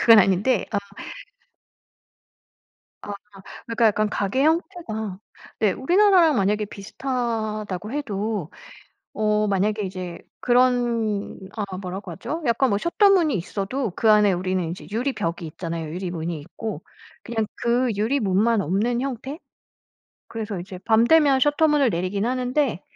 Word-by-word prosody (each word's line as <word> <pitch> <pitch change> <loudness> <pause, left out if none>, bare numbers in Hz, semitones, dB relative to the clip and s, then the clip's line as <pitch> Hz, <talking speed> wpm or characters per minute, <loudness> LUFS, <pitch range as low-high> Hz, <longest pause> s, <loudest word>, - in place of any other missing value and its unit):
그건 230 -2 +8
아닌데 195 +4 +3
어 205 - +2 2.2
아 205 - -6 0.5
그러니까 230 0 +1
약간 215 0 +1
가게 210 +7 0
형태가 305 - -1 0.4
네 215 -3 +3
우리나라랑 350 - +4
만약에 210 0 +1
비슷하다고 215 -2 -3
해도 210 - -3 0.6
어 210 0 +1
만약에 205 +2 +1
이제 185 -2 -6 0.2
그런 240 -4 +1 0.2
아 200 -4 -4
뭐라고 185 0 -6
하죠 310 - -5
약간 245 +2 +2
뭐 200 - +2
셔터 345 - +3
문이 335 - +3
있어도 200 +6 -3
그 220 -2 +4
안에 210 -2 +5
우리는 185 -1 -1
이제 175 - -9
유리 250 +6 -1
벽이 170 -3 -3
있잖아요, 165 0 -5
유리문이 175 -3 -4
있고. 180 +8 -6 0.4
그냥 225 -2 -1
그 245 +2 +1
유리문만 215 -1 +2
없는 210 +8 0
형태. 270 +3 -4 0.9
그래서 215 -4 -5
이제 185 +1 -8
밤 225 0 +4
되면 290 -2 +5
셔터 295 +4 +3
문을 295 -4 +3
내리긴 185 +3 -1
하는데 250 - 0
215 Hz, 285 characters per minute, -23 LUFS, 195-255 Hz, 2.2 s, 그건